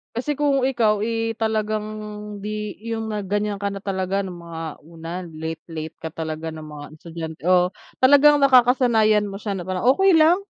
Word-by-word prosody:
Kasi 275 +5 -2
kung 285 -1 +2
ikaw, 225 -5 +2
eh, 225 +1 -1
talagang 215 -1 -1 0.6
di 210 -1 -4
yung 225 -1 -3
na 210 -2 -3
gan'yan 205 +2 -1
ka 200 0 -3
na 200 - -6
talaga 190 0 -2
ng 185 -3 -5
mga 165 -1 -7 0.2
una 165 +3 -7
late, 160 -1 -6
late 160 -1 -6
ka 160 - -4
talaga 160 0 -5
ng 155 -1 -9
mga 150 -1 -9
estudyante 160 -1 -7
o 180 0 +4 0.2
talagang 285 +3 +6
nakakasanayan 245 -5 +4
mo 200 -1 -6
siya 205 -2 -3
na 180 - -5
parang, 185 +5 -2
"Okey 385 +9 +5
lang 335 +3 +5
205 Hz, 175 wpm, -22 LUFS, 170-230 Hz, 0.6 s, talagang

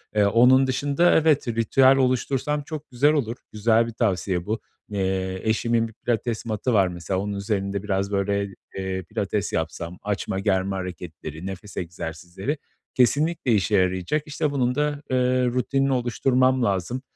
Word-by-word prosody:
Eee, 105 -1 +4
onun 125 +5 +5
dışında, 140 +6 +2
evet, 155 -4 +3
ritüel 120 +4 +4
oluştursam 135 +3 0
çok 155 +1 -7
güzel 140 +5 +3
olur. 120 -6 -1 0.2
Güzel 115 +2 +2
bir 115 - -6
tavsiye 95 -5 0
bu. 110 +2 -2 0.3
Eee, 95 -2 -1
eşimin 115 +1 +1
1 110 - -14
pilates 115 0 -2
mat'ı 115 +2 -1
var 100 -3 +4
mesela, 90 +1 -3
onun 100 +1 -3
üzerinde 100 -1 -2
biraz 100 -1 -1
böyle, 100 0 0 0.2
eee, 95 -1 -3
pilates 105 +1 -2
yapsam, 85 +2 -3
açma-germe 95 -1 -1
hareketleri, 85 -3 -7
nefes 95 +2 -8
egzersizleri 90 - -4 0.4
kesinlikle 145 +2 +2
işe 105 0 +2
yarayacak. 95 +10 +1
İşte 150 0 -1
bunun 125 -3 0
da, 145 0 -1
ııı, 125 -1 +2
rutinini 135 +2 +1
oluşturmam 130 +1 +2
lazım. 100 +5 -1
110 Hz, 145 wpm, -24 LUFS, 95-130 Hz, 0.4 s, onun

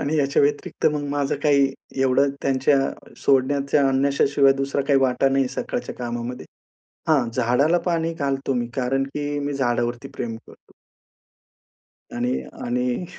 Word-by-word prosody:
आणि 150 +3 -1
याच्या 140 -1 +2
व्यतिरिक्त 145 0 0
मग 150 -1 -2
माझं 145 -1 0
काही 140 -2 +3 0.3
एवढं 135 +2 +3
त्यांच्या 135 +1 0
सोडण्याच्या 140 +1 +2
आणण्याच्या 140 +1 +2
शिवाय 140 -1 +6
दुसरा 140 +1 -1
काही 140 -2 +5
वाटा 135 +1 +2
नाही 135 -1 +1
सकाळच्या 245 0 -3
कामामध्ये. 120 +1 -5 0.6
हां, 140 -7 +3
झाडाला 125 +8 +2
पाणी 165 -2 0
घालतो 140 -3 -2
मी. 120 -2 -1
कारण, 135 +1 0
की 145 0 -2
मी 145 0 -3
झाडावरती 120 -1 -1
प्रेम 115 -1 -4
करतो. - - -18 1.4
आणि 125 +1 -1 0.2
आणि 125 +6 -1
135 Hz, 135 wpm, -23 LUFS, 125-145 Hz, 1.4 s, शिवाय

